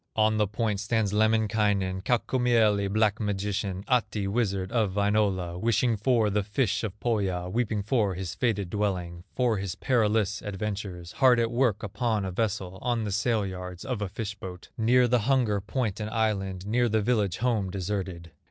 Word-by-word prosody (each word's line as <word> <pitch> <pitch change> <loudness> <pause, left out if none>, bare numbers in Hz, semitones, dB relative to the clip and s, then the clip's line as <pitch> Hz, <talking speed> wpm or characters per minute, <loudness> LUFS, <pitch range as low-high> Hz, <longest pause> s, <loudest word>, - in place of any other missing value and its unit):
On 110 0 +3
the 105 -1 +2
point 105 0 -1
stands 105 -1 0
Lemminkainen, 105 -3 +1
Kaukomieli, 115 -3 +2
black 110 0 +2
magician, 100 -2 -2
Ahti, 105 -5 +1
wizard 100 -3 -1
of 105 -5 0
Wainola, 100 -4 +1
Wishing 115 +2 +2
for 110 -1 +2
the 105 +1 +1
fish 105 +1 0
of 105 -1 -5
Pohya, 95 -7 -1
Weeping 110 -2 -1
for 105 -4 +1
his 95 0 -4
fated 100 -4 -1
dwelling, 90 -4 -2
For 120 -5 +1
his 95 -2 -4
perilous 110 -4 +1
adventures, 100 -3 -5
Hard 130 -3 +4
at 115 0 +1
work 120 -4 +1
upon 105 0 -1
a 95 - -3
vessel, 95 -2 -2
On 120 -2 0
the 105 - -3
sail 105 +1 +1
yards 90 0 -7
of 125 -6 -3
a 100 - -2
fish 105 +1 -4
boat, 90 -3 -9
Near 125 +1 +4
the 125 0 +3
hunger 115 -7 +2
point 110 0 -2
and 105 0 -3
island, 100 -4 -1
Near 120 +3 +2
the 110 -1 +1
village 105 -6 +1
home 115 -5 0
deserted. 90 -2 -4
105 Hz, 170 wpm, -27 LUFS, 95-115 Hz, -, Hard